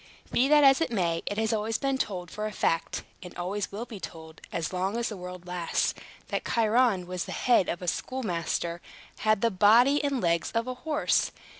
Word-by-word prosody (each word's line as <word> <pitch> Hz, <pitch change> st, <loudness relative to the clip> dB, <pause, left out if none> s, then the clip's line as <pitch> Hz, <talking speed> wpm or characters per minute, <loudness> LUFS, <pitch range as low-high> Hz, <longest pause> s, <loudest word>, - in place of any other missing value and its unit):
Be 255 Hz, -, +3 dB
that 295 Hz, 0 st, +6 dB
as 270 Hz, +2 st, +6 dB
it 325 Hz, -, +1 dB
may, 170 Hz, -7 st, 0 dB
it 205 Hz, -, -2 dB
has 220 Hz, 0 st, +1 dB
always 220 Hz, +1 st, 0 dB
been 275 Hz, -1 st, -1 dB
told 180 Hz, -7 st, -3 dB
for 215 Hz, 0 st, -3 dB
a -, -, -5 dB
fact 165 Hz, -4 st, -1 dB, 0.2 s
(and 180 Hz, -1 st, -10 dB
always 190 Hz, +3 st, -3 dB
will 215 Hz, +4 st, -5 dB
be 220 Hz, -5 st, -9 dB
told, 160 Hz, -3 st, -9 dB
as 165 Hz, +2 st, -3 dB
long 190 Hz, +4 st, -1 dB
as 235 Hz, 0 st, -1 dB
the 215 Hz, -, -5 dB
world 180 Hz, -1 st, -8 dB
lasts), 180 Hz, -1 st, -1 dB, 0.4 s
that -, -, -2 dB
Chiron, 225 Hz, -4 st, +2 dB
with 180 Hz, 0 st, -4 dB
the -, -, -6 dB
head 240 Hz, -7 st, +3 dB
of 175 Hz, -, -3 dB
a -, -, -5 dB
schoolmaster, 170 Hz, -7 st, -2 dB, 0.4 s
had 215 Hz, -2 st, +2 dB
the 230 Hz, -, +2 dB
body 235 Hz, +9 st, +5 dB
and 280 Hz, -2 st, 0 dB
legs 170 Hz, -4 st, +1 dB
of 230 Hz, 0 st, 0 dB
a 255 Hz, -, -3 dB
horse. 300 Hz, +4 st, +1 dB
210 Hz, 205 wpm, -28 LUFS, 180-240 Hz, 0.4 s, that